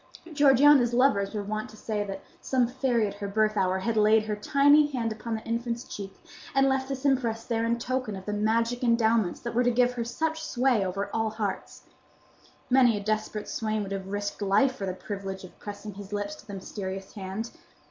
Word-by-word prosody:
Georgiana's 275 Hz, -3 st, +5 dB
lovers 220 Hz, -6 st, +2 dB
were 205 Hz, -, -2 dB
wont 215 Hz, +2 st, -4 dB
to 215 Hz, -, -14 dB
say 210 Hz, -1 st, -2 dB
that 195 Hz, -1 st, -7 dB, 0.2 s
some 255 Hz, -2 st, +2 dB
fairy 245 Hz, -2 st, +1 dB
at 200 Hz, -, -3 dB
her 200 Hz, 0 st, -5 dB
birth 215 Hz, +1 st, +1 dB
hour 190 Hz, -2 st, +1 dB
had 220 Hz, +4 st, -1 dB
laid 215 Hz, 0 st, +5 dB
her 215 Hz, -1 st, -2 dB
tiny 285 Hz, +7 st, +4 dB
hand 240 Hz, -6 st, -2 dB
upon 225 Hz, +1 st, -4 dB
the 220 Hz, -, -6 dB
infant's 235 Hz, +1 st, -2 dB
cheek, 195 Hz, -1 st, -7 dB, 0.4 s
and 270 Hz, 0 st, +5 dB
left 265 Hz, 0 st, 0 dB
this 270 Hz, 0 st, -4 dB
impress 235 Hz, -5 st, +1 dB
there 230 Hz, -2 st, -1 dB
in 235 Hz, +1 st, +1 dB
token 250 Hz, -3 st, -2 dB
of 190 Hz, 0 st, -9 dB
the 210 Hz, -, -3 dB
magic 230 Hz, +4 st, 0 dB
endowments 230 Hz, -5 st, +2 dB
that 235 Hz, -, -4 dB
were 245 Hz, +2 st, +3 dB
to 245 Hz, -, +3 dB
give 245 Hz, +1 st, +3 dB
her 240 Hz, -1 st, -2 dB
such 320 Hz, +7 st, -2 dB
sway 250 Hz, -6 st, +2 dB
over 195 Hz, +2 st, -3 dB
all 225 Hz, -1 st, +1 dB
hearts. 210 Hz, -3 st, -4 dB, 0.8 s
Many 250 Hz, -4 st, +4 dB
a 205 Hz, -, -5 dB
desperate 215 Hz, 0 st, -2 dB
swain 215 Hz, -1 st, -2 dB
would 195 Hz, -, -7 dB
have 195 Hz, -1 st, -4 dB
risked 205 Hz, +1 st, -4 dB
life 205 Hz, +7 st, +3 dB
for 195 Hz, -6 st, -4 dB
the 185 Hz, -, -2 dB
privilege 195 Hz, -1 st, -6 dB
of 185 Hz, -, -13 dB
pressing 205 Hz, 0 st, -7 dB
his 200 Hz, +1 st, -10 dB
lips 205 Hz, 0 st, -3 dB
to -, -, -16 dB
the 200 Hz, -, -6 dB
mysterious 190 Hz, 0 st, -6 dB
hand. 200 Hz, +3 st, -5 dB
220 Hz, 210 wpm, -27 LUFS, 205-245 Hz, 0.8 s, Georgiana's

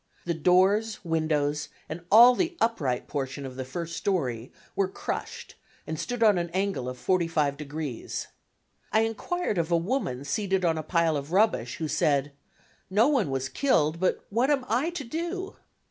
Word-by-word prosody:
The 170 Hz, -, 0 dB
doors, 190 Hz, +7 st, +3 dB
windows 150 Hz, -3 st, 0 dB, 0.2 s
and 165 Hz, +2 st, -6 dB
all 240 Hz, +4 st, +9 dB
the 345 Hz, +5 st, -1 dB
upright 150 Hz, -, 0 dB
portion 135 Hz, -1 st, -4 dB
of 130 Hz, -1 st, -7 dB
the 130 Hz, -, -4 dB
first 170 Hz, +6 st, -5 dB
story, 130 Hz, -, -2 dB, 0.2 s
were 195 Hz, -, +2 dB
crushed 190 Hz, -, -5 dB, 0.3 s
and 160 Hz, -1 st, -4 dB
stood 245 Hz, -1 st, -1 dB
on 210 Hz, -5 st, +5 dB
an 170 Hz, 0 st, -3 dB
angle 190 Hz, -10 st, -1 dB
of 125 Hz, -, -7 dB
45°. 150 Hz, -5 st, -1 dB, 0.7 s
I 220 Hz, -, +4 dB
enquired 225 Hz, -, -1 dB
of 165 Hz, +1 st, -1 dB
a 170 Hz, -, +5 dB
woman 165 Hz, -, -2 dB
seated 190 Hz, +4 st, 0 dB
on 165 Hz, -2 st, +1 dB
a -, -, -1 dB
pile 165 Hz, 0 st, +1 dB
of 145 Hz, +2 st, -4 dB
rubbish, 190 Hz, -, +2 dB
who 160 Hz, -, -2 dB
said 145 Hz, -1 st, +1 dB, 0.6 s
"no 210 Hz, +6 st, +4 dB
one 255 Hz, -, +2 dB
was 135 Hz, 0 st, -1 dB
killed, 160 Hz, -, +1 dB
but 185 Hz, -, 0 dB
what 240 Hz, +6 st, +2 dB
am 275 Hz, -3 st, +1 dB
I 250 Hz, +9 st, +1 dB
to 340 Hz, -4 st, -5 dB
do?" 345 Hz, +8 st, -4 dB
170 Hz, 165 wpm, -27 LUFS, 145-225 Hz, 0.7 s, all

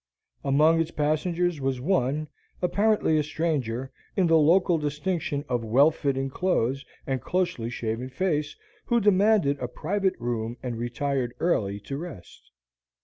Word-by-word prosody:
Among 155 Hz, +4 st, +4 dB
its 165 Hz, -, -2 dB
passengers 165 Hz, +2 st, 0 dB
was 135 Hz, -1 st, -1 dB
one, 150 Hz, -1 st, 0 dB, 0.3 s
apparently 200 Hz, -3 st, +2 dB
a -, -, +1 dB
stranger, 135 Hz, -6 st, -2 dB, 0.3 s
in 190 Hz, -, +4 dB
the 165 Hz, -1 st, +4 dB
local 170 Hz, +2 st, +4 dB
distinction 150 Hz, 0 st, -2 dB
of 120 Hz, -2 st, -1 dB
well 135 Hz, +8 st, +5 dB
fitting 135 Hz, -3 st, -1 dB
clothes 140 Hz, -6 st, 0 dB, 0.2 s
and 135 Hz, -2 st, -2 dB
closely 175 Hz, -10 st, -1 dB
shaven 115 Hz, +1 st, -3 dB
face, 150 Hz, 0 st, -1 dB, 0.3 s
who 235 Hz, -, +2 dB
demanded 200 Hz, -7 st, +3 dB
a 125 Hz, -, -2 dB
private 190 Hz, +8 st, -1 dB
room 120 Hz, -1 st, -3 dB
and 125 Hz, -2 st, -3 dB
retired 120 Hz, +1 st, -2 dB
early 100 Hz, -, 0 dB
to 135 Hz, +6 st, -5 dB
rest. 165 Hz, -, -10 dB
145 Hz, 140 wpm, -26 LUFS, 125-175 Hz, 0.3 s, well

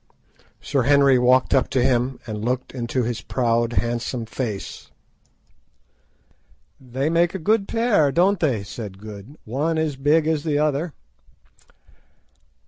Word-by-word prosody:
Sir 140 Hz, -2 st, -1 dB
Henry 140 Hz, 0 st, +4 dB
walked 125 Hz, +1 st, +3 dB
up 135 Hz, -, +2 dB
to 130 Hz, -2 st, +1 dB
him 125 Hz, 0 st, +1 dB
and 105 Hz, -2 st, -5 dB
looked 125 Hz, +2 st, -2 dB
into 125 Hz, 0 st, -2 dB
his 120 Hz, 0 st, -3 dB
proud, 115 Hz, -2 st, 0 dB
handsome 120 Hz, 0 st, -2 dB
face. 110 Hz, -4 st, -5 dB, 1.9 s
"They 130 Hz, +2 st, -3 dB
make 170 Hz, +2 st, +2 dB
a -, -, 0 dB
good 200 Hz, +4 st, +1 dB
pair, 225 Hz, -, +2 dB
don't 185 Hz, +5 st, +2 dB
they?" 125 Hz, -11 st, 0 dB
said 100 Hz, -2 st, -8 dB
Good; 105 Hz, +5 st, -11 dB
"one 150 Hz, +8 st, -1 dB
as 155 Hz, -3 st, -1 dB
big 150 Hz, +3 st, +3 dB
as 155 Hz, -2 st, 0 dB
the 155 Hz, -3 st, 0 dB
other." 150 Hz, +2 st, 0 dB
130 Hz, 135 wpm, -22 LUFS, 120-155 Hz, 1.9 s, Henry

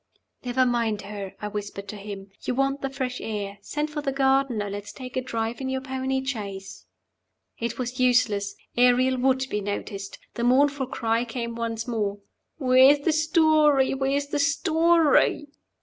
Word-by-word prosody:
"Never 255 Hz, +1 st, +2 dB
mind 230 Hz, -4 st, 0 dB
her," 200 Hz, -1 st, -7 dB
I -, -, -1 dB
whispered 200 Hz, -1 st, -6 dB
to -, -, -5 dB
him. 200 Hz, -1 st, -8 dB
"You 250 Hz, -, -2 dB
want 275 Hz, +1 st, 0 dB
the 270 Hz, -, -2 dB
fresh 260 Hz, -2 st, -4 dB
air. 205 Hz, -2 st, -4 dB
Send 300 Hz, +7 st, -3 dB
for 300 Hz, -1 st, -3 dB
the 280 Hz, -2 st, -1 dB
gardener. 265 Hz, -5 st, +1 dB
Let 200 Hz, +1 st, -4 dB
us 205 Hz, -, -8 dB
take 255 Hz, -1 st, -9 dB
a 255 Hz, -, +1 dB
drive 230 Hz, -1 st, -3 dB
in 260 Hz, -, -2 dB
your 265 Hz, 0 st, -2 dB
pony 265 Hz, 0 st, -2 dB
chaise." 200 Hz, -7 st, -6 dB, 0.7 s
It 235 Hz, 0 st, -3 dB
was 255 Hz, 0 st, -4 dB
useless. 240 Hz, -5 st, +2 dB, 0.2 s
Ariel 250 Hz, +1 st, +4 dB
would 260 Hz, +1 st, +2 dB
be 210 Hz, -, -1 dB
noticed. 200 Hz, 0 st, -5 dB, 0.2 s
The 235 Hz, -, -3 dB
mournful 270 Hz, +2 st, +3 dB
cry 230 Hz, -1 st, 0 dB
came 235 Hz, 0 st, -4 dB
once 230 Hz, 0 st, -3 dB
more 210 Hz, -4 st, -1 dB, 0.4 s
"Where's 265 Hz, +1 st, +5 dB
the 315 Hz, +2 st, +1 dB
story? 310 Hz, -3 st, +4 dB
where's 275 Hz, +1 st, -1 dB
the 295 Hz, -, -1 dB
story?" 320 Hz, 0 st, +3 dB
255 Hz, 165 wpm, -25 LUFS, 220-275 Hz, 0.7 s, Where's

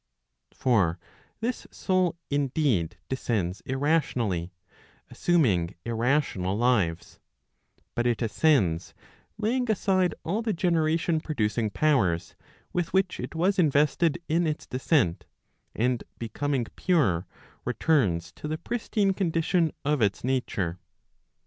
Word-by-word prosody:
For 100 Hz, -9 st, +2 dB, 0.4 s
this 240 Hz, +2 st, -3 dB
soul 185 Hz, -3 st, 0 dB
indeed 140 Hz, -, +1 dB
descends 105 Hz, -8 st, -2 dB
irrationally, 130 Hz, -, 0 dB, 0.6 s
assuming 110 Hz, -, +2 dB
irrational 115 Hz, -5 st, 0 dB
lives; 105 Hz, -9 st, 0 dB, 0.7 s
but 120 Hz, +1 st, 0 dB
it 120 Hz, 0 st, 0 dB
ascends 105 Hz, -, +2 dB, 0.4 s
laying 235 Hz, +3 st, 0 dB
aside 185 Hz, -4 st, +2 dB
all 200 Hz, +7 st, -1 dB
the 225 Hz, -2 st, -1 dB
generation 165 Hz, -2 st, +1 dB
producing 115 Hz, -7 st, -1 dB
powers, 100 Hz, -, +1 dB, 0.4 s
with 175 Hz, -2 st, -1 dB
which 190 Hz, -1 st, +1 dB
it -, -, -6 dB
was 185 Hz, +4 st, +2 dB
invested 155 Hz, +1 st, +3 dB
iu 165 Hz, +3 st, +2 dB
its 155 Hz, -1 st, -3 dB
descent, 130 Hz, -, +1 dB, 0.5 s
and 125 Hz, +1 st, 0 dB
becoming 130 Hz, +2 st, -2 dB
[pure, 125 Hz, -, +1 dB, 0.4 s
returns 90 Hz, -, +1 dB
to 150 Hz, -, -8 dB
the 155 Hz, +1 st, -2 dB
pristine 210 Hz, -1 st, 0 dB
condition 165 Hz, -2 st, +1 dB
of 150 Hz, -2 st, +1 dB
its 100 Hz, -2 st, +1 dB
nature. 105 Hz, -9 st, -1 dB
140 Hz, 105 wpm, -27 LUFS, 105-170 Hz, 0.7 s, invested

